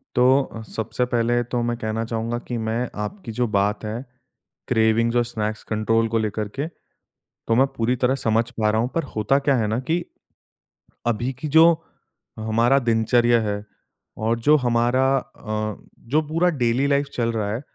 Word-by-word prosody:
तो, 125 Hz, -2 st, +3 dB
सबसे 115 Hz, +3 st, -2 dB
पहले 120 Hz, +1 st, +2 dB
तो 120 Hz, -1 st, +1 dB
मैं 120 Hz, 0 st, -1 dB
कहना 110 Hz, 0 st, -2 dB
चाहूँगा 115 Hz, +1 st, -2 dB
कि 120 Hz, -, -2 dB
मैं 115 Hz, +2 st, -1 dB, 0.2 s
आपकी 150 Hz, -, -7 dB
जो 120 Hz, -, +2 dB
बात 105 Hz, +1 st, 0 dB
है, 115 Hz, +5 st, -4 dB, 0.6 s
क्रेविंग्स 115 Hz, 0 st, +2 dB
और 120 Hz, -, +4 dB
स्नैक्स 110 Hz, -2 st, -3 dB
कंट्रोल 115 Hz, +1 st, +2 dB
को 115 Hz, -, +1 dB
लेकर 110 Hz, -1 st, -1 dB
के, 140 Hz, +9 st, -4 dB, 0.6 s
तो 115 Hz, -, -3 dB
मैं 135 Hz, +3 st, +5 dB
पूरी 120 Hz, +2 st, +1 dB
तरह 130 Hz, -, +3 dB
समझ 115 Hz, +2 st, +2 dB
पा 110 Hz, -3 st, 0 dB
रहा 110 Hz, +1 st, +1 dB
हूँ 120 Hz, -, 0 dB
पर 165 Hz, -, +1 dB
होता 120 Hz, +6 st, +2 dB
क्या 140 Hz, -1 st, +2 dB
है 110 Hz, -3 st, +1 dB
ना 110 Hz, +2 st, 0 dB
की, 170 Hz, +1 st, +1 dB, 1.0 s
अभी 120 Hz, +3 st, 0 dB
की 155 Hz, -, -3 dB
जो 165 Hz, -, +9 dB, 0.7 s
हमारा 115 Hz, +5 st, +3 dB
दिनचर्या 120 Hz, 0 st, +3 dB
है 105 Hz, -1 st, -2 dB, 0.5 s
और 115 Hz, +2 st, 0 dB
जो 150 Hz, +1 st, +7 dB
हमारा 120 Hz, +2 st, +2 dB
अ, 110 Hz, -3 st, -4 dB, 0.2 s
जो 145 Hz, +7 st, 0 dB
पूरा 165 Hz, +3 st, +2 dB
डेली 120 Hz, +4 st, +2 dB
लाइफ 140 Hz, 0 st, +1 dB
चल 115 Hz, -1 st, 0 dB
रहा 105 Hz, -2 st, -1 dB
है, 115 Hz, -, -3 dB
115 Hz, 170 wpm, -23 LUFS, 110-125 Hz, 1.0 s, जो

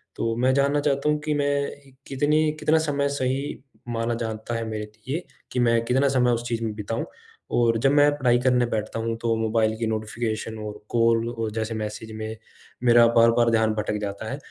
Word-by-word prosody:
तो 115 Hz, 0 st, -1 dB
मैं 130 Hz, +3 st, +2 dB
जानना 140 Hz, +2 st, +2 dB
चाहता 145 Hz, 0 st, +1 dB
हूँ 150 Hz, 0 st, +1 dB
कि 155 Hz, -, +1 dB
मैं 140 Hz, -1 st, -2 dB
कितनी 150 Hz, +3 st, +2 dB
कितना 155 Hz, +1 st, +3 dB
समय 145 Hz, -3 st, 0 dB
सही 135 Hz, 0 st, -2 dB, 0.3 s
माना 115 Hz, 0 st, -1 dB
जाता 115 Hz, 0 st, -4 dB
है 115 Hz, -, -2 dB
मेरे 110 Hz, -1 st, -3 dB, 0.2 s
लिए 160 Hz, +7 st, -3 dB, 0.3 s
कि 125 Hz, -, -1 dB
मैं 115 Hz, -1 st, +3 dB
कितना 130 Hz, +4 st, +2 dB
समय 125 Hz, -2 st, +3 dB
उस 120 Hz, 0 st, -1 dB
चीज़ 115 Hz, -1 st, -2 dB
में 110 Hz, -1 st, -2 dB
बिताऊँ। 110 Hz, +2 st, -3 dB, 0.5 s
और 115 Hz, -1 st, +3 dB
जब 135 Hz, -, +5 dB
मैं 145 Hz, 0 st, +5 dB
पढ़ाई 125 Hz, -3 st, +3 dB
करने 125 Hz, -1 st, +3 dB
बैठता 110 Hz, -1 st, -3 dB
हूँ, 115 Hz, 0 st, -2 dB
तो 115 Hz, 0 st, 0 dB
मोबाइल 110 Hz, 0 st, +1 dB
की 115 Hz, 0 st, -1 dB
नोटिफ़िकेशन 110 Hz, 0 st, -3 dB
और 105 Hz, 0 st, -7 dB
कॉल 115 Hz, -1 st, +2 dB
और 115 Hz, -2 st, -3 dB
जैसे 110 Hz, +1 st, -3 dB
मैसेज 110 Hz, +1 st, -5 dB
में 110 Hz, 0 st, -5 dB, 0.5 s
मेरा 120 Hz, -1 st, +6 dB
बार-बार 115 Hz, 0 st, +5 dB
ध्यान 110 Hz, -1 st, +2 dB
भटक 105 Hz, 0 st, -1 dB
जाता 100 Hz, +1 st, -4 dB
है। 135 Hz, -, -3 dB
115 Hz, 195 wpm, -24 LUFS, 110-135 Hz, 0.5 s, मेरा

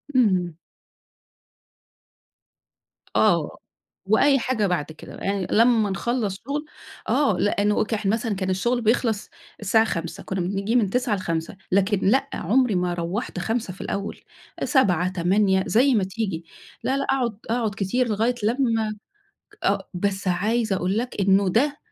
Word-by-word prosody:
اهم. 185 Hz, -9 st, +2 dB, 2.6 s
آه، -, -, +2 dB, 0.5 s
وأي 270 Hz, +7 st, +4 dB
حاجة 225 Hz, -5 st, 0 dB
بعد 175 Hz, -5 st, 0 dB
كده، 155 Hz, -, -11 dB
يعني 195 Hz, -2 st, -2 dB
لمّا 225 Hz, -2 st, +4 dB
نخلَّص 210 Hz, +1 st, -1 dB
شغل 295 Hz, +2 st, -2 dB, 0.4 s
آه، 265 Hz, -11 st, +2 dB
لأنه 205 Hz, +1 st, +2 dB
كح 220 Hz, -1 st, -3 dB
مثلًا 220 Hz, +1 st, 0 dB
كان 190 Hz, -1 st, -2 dB
الشغل 235 Hz, +6 st, 0 dB
بيخلص 225 Hz, -1 st, +1 dB, 0.3 s
الساعة 220 Hz, +2 st, +3 dB
17:00، 170 Hz, -5 st, -4 dB
كنّا 190 Hz, -1 st, -3 dB
بنيجي 195 Hz, +5 st, -1 dB
من 220 Hz, -6 st, +3 dB
09:00 245 Hz, -1 st, 0 dB
ل17:00، 165 Hz, -1 st, -3 dB
لكن 200 Hz, +1 st, +2 dB
لأ، 265 Hz, +8 st, +2 dB
عمري 235 Hz, +3 st, +1 dB
ما 180 Hz, -1 st, 0 dB
روَّحت 180 Hz, +4 st, -3 dB
17:00 220 Hz, 0 st, -2 dB
في -, -, -11 dB
الأول، 200 Hz, 0 st, -4 dB, 0.4 s
19:00 180 Hz, -, +3 dB
20:00 190 Hz, +2 st, +2 dB
زي 260 Hz, +5 st, +4 dB
ما 205 Hz, -, +2 dB
تيجي، 190 Hz, -4 st, -3 dB, 0.4 s
لا، 265 Hz, -, +1 dB
لا، 275 Hz, -, -1 dB
أقعد 245 Hz, -7 st, 0 dB
أقعد 225 Hz, -3 st, 0 dB
كتير 240 Hz, +6 st, 0 dB
لغاية 225 Hz, +4 st, +1 dB
لمّا 225 Hz, -2 st, +1 dB, 0.7 s
آه، -, -, 0 dB
بس 195 Hz, +1 st, -1 dB
عايزة 210 Hz, +3 st, +1 dB
أقول 185 Hz, +4 st, 0 dB
لك 245 Hz, -3 st, -3 dB
إنه 195 Hz, 0 st, +3 dB
ده 280 Hz, +9 st, +1 dB
205 Hz, 140 wpm, -24 LUFS, 190-235 Hz, 2.6 s, وأي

